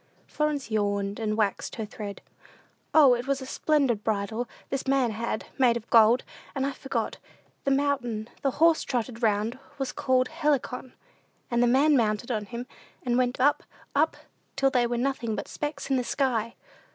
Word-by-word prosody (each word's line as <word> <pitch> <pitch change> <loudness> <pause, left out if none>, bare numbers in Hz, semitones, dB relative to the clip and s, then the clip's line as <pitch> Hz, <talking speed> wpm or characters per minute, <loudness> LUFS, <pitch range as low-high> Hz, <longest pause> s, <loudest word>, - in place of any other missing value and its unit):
Florence 295 -6 -2
yawned, 205 -1 0
and 215 -1 -1
waxed 210 -3 -1
her 220 - -3
thread. 205 -1 -7 0.7
"O, 290 -5 +7
it 245 +2 -2
was 275 -1 +1
a 260 - -7
splendid 265 -6 +1
bridle, 220 +3 -1 0.2
this 275 0 -2
man 265 -3 +2
had, 220 0 -3
made 240 -3 +4
of 230 - -10
gold; 230 +2 +6 0.3
and 270 -1 0
I 280 - 0
forgot 270 0 -3 0.5
the - - +2
mountain 270 -6 0
the 275 - +2
horse 330 +1 +5
trotted 240 -1 -3
round 220 +2 +1
on - - -22 0.2
was 270 -2 -2
called 255 -1 +1
Helicon. 290 -5 -1 0.6
And 235 0 +2
the 245 - +4
man 280 +5 +4
mounted 225 0 +1
him, 235 +2 -3 0.4
and 245 -2 0
went 250 0 +1
up, 285 +3 +3 0.3
up, - - +2 0.4
till 270 0 +2
they 245 -3 +3
were 240 0 -1
nothing 240 -3 -1
but - - -5
specks 290 -2 -4
in 265 - +4
the 250 - 0
sky." 235 -4 0
245 Hz, 175 wpm, -27 LUFS, 225-275 Hz, 0.7 s, O